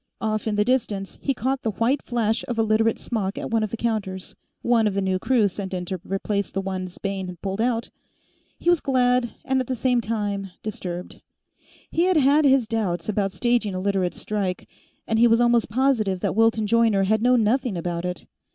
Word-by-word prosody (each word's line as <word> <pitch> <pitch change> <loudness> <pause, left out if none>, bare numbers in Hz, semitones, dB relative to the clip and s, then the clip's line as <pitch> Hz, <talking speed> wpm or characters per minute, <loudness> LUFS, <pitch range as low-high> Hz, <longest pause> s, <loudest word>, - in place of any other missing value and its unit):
Off 215 0 -2
in 215 - 0
the 210 0 +2
distance, 215 -6 -1
he 275 - 0
caught 265 +1 -1
the 225 - -1
white 245 +7 +1
flash 225 -2 -1
of 240 - -3
a 225 - +3
Literate 220 +1 +2
smock 205 -4 -3
at - - -5
one 225 -1 +2
of 215 - -1
the 230 - -5
counters; 200 -5 -3 0.3
one 230 -2 +3
of 200 - -2
the 200 - +1
new 190 -1 0
crew 235 -1 +3
sent 190 0 -5
in 180 -1 -3
to 185 -1 -4
replace 200 0 -2
the 195 - -3
ones 185 -2 -4
Bayne 195 -2 -3
had 180 -2 -8
pulled 195 +2 -2
out. 235 -1 0 0.7
He - - -9
was 350 -2 +4
glad 250 -2 +1
and 265 -1 +1
at 255 - -5
the 255 - -1
same 245 0 +1
time 205 -3 -2
disturbed. 180 -4 -6 0.7
He 335 +2 +2
had 370 -2 +3
had 290 +1 +4
his 265 -4 +4
doubts 205 -6 -2
about 200 -2 0
staging 230 0 0
a - - -2
Literates' 190 -2 -1
strike, 195 -4 -3 0.4
and 225 0 0
he 240 - +7
was 230 0 +4
almost 240 -2 +3
positive 220 -6 +1
that - - -1
Wilton 225 -1 +3
Joyner 225 -3 +3
had 215 +3 +2
known 245 -1 +4
nothing 235 -2 +1
about 170 0 -3
it. 180 0 -4
220 Hz, 210 wpm, -24 LUFS, 195-240 Hz, 0.7 s, he